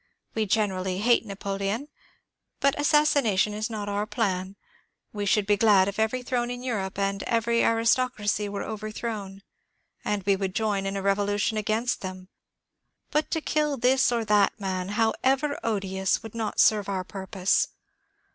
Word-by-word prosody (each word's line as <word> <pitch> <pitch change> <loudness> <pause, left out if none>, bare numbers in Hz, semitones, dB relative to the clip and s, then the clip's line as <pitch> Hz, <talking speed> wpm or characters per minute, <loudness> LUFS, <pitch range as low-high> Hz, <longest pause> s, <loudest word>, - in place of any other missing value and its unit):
We 220 -1 -1
generally 190 -3 0
hate 230 +2 +3
Napoleon, 200 +5 -3 0.7
but 275 0 +3
assassination 285 -9 +3
is 215 +3 -3
not 210 -2 -4
our 205 +1 -1
plan. 190 -4 -1 0.6
We 205 -1 -3
should 205 0 +3
be 205 0 +3
glad 200 -3 +5
if 200 +1 -4
every 220 +3 0
throne 245 -1 -1
in 245 0 -5
Europe 200 -7 -3
and 195 0 -1
every 230 0 +2
aris> 230 0 +4
tocracy 210 -5 -1
were 200 0 -4
overthrown, 215 -2 -5 0.6
and 205 -2 -1
we 200 +1 +3
would 190 -1 -3
join 205 -3 0
in 195 0 -2
a 195 - -4
revolution 205 +2 +1
against 215 +3 -1
them; 185 -1 -7 0.8
but 300 +1 +1
to 320 - -1
kill 300 -2 0
this 255 +1 +3
or 230 -2 0
that 210 0 +3
man, 185 -2 -3
however 265 +6 +1
odious, 190 -3 -1
would 225 - -9
not 225 -2 -3
serve 210 -2 +4
our 190 -2 -1
purpose. 190 0 0
210 Hz, 155 wpm, -26 LUFS, 195-230 Hz, 0.8 s, glad